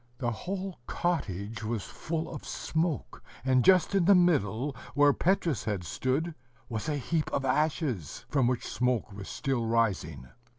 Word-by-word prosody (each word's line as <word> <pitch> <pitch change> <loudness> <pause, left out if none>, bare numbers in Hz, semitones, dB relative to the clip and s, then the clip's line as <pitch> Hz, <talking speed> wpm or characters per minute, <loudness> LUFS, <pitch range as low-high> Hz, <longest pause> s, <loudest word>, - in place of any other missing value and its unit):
The 120 -3 -1
whole 185 - -4
cottage 110 - -2
was 110 -2 -2
full 160 0 -4
of - - -7
smoke; 160 -4 -2 0.2
and 130 -2 +4
just 185 0 +5
in 195 -3 +3
the 200 +2 +7
middle, 145 - +2 0.2
where 145 0 +6
Petrus 170 - +1
had 105 -5 -1
stood, 135 - -1 0.3
was 110 +1 -3
a 150 - 0
heap 155 +3 -1
of 135 - 0
ashes, 135 - 0
from 135 -4 +2
which 125 -1 0
smoke 125 -4 0
was 100 -1 -8
still 135 -5 -1
rising. 95 - 0
130 Hz, 155 wpm, -29 LUFS, 110-165 Hz, 0.3 s, the